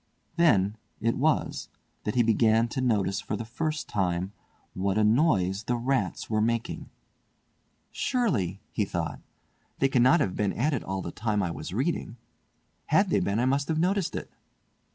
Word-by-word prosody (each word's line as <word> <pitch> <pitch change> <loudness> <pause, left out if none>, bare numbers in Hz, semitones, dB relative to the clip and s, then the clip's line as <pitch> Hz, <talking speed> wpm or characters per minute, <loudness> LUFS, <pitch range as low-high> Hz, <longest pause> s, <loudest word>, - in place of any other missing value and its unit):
Then 110 - +3 0.2
it 115 +1 +1
was 155 +3 0 0.4
that 105 - -2
he 120 - +4
began 115 0 +3
to 130 - -3
notice 100 -6 +1
for 105 - -3
the 110 +2 -5
first 155 +6 -3
time 90 -1 -1 0.4
what 95 +1 -1
a 110 - +3
noise 105 - +2
the 120 - 0
rats 130 +3 -1
were 110 -1 +1
making. 115 +1 -1 1.0
"Surely," 110 - 0
he 105 - 0
thought, 80 -6 -3 0.6
"they 135 - +2
cannot 130 +5 +5
have 95 - 0
been 105 -2 0
at 145 +7 0
it 130 - -2
all 95 0 -3
the - - -5
time 105 -2 -1
I 90 - -1
was 85 - -6
reading. 125 - -2 0.7
Had - - +3
they - - +3
been, 100 +3 0
I 125 - +2
must 140 +2 +1
have 160 - 0
noticed 185 +2 +1
it!" - - -5
115 Hz, 170 wpm, -27 LUFS, 100-135 Hz, 1.0 s, cannot